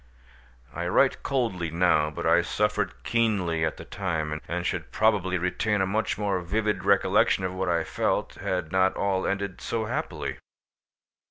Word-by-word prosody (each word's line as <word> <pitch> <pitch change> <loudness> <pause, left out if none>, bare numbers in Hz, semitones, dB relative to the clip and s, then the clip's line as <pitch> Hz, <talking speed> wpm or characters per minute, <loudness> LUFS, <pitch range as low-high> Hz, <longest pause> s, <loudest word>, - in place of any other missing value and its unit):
I 85 0 -3
write 130 +9 +3
coldly 115 - -1
now, 80 -2 +3
but 75 - -6
I - - +5
suffered - - -1
keenly 100 -9 +1
at 80 - -1
the - - -9
time, 80 -5 -3
and 85 +1 -3
should 85 -8 -3
probably 100 -3 +2
retain 95 +4 0
a 95 - +2
much 105 +4 -1
more 100 -3 0
vivid 105 +4 -1
recollection 95 - +3
of 90 -1 -2
what 95 0 -2
I 85 -1 +1
felt, - - -1
had 90 -3 -2
not 95 0 +3
all 95 -1 0
ended 100 -1 -3
so 115 -1 -2
happily. - - -4
95 Hz, 160 wpm, -26 LUFS, 85-105 Hz, -, I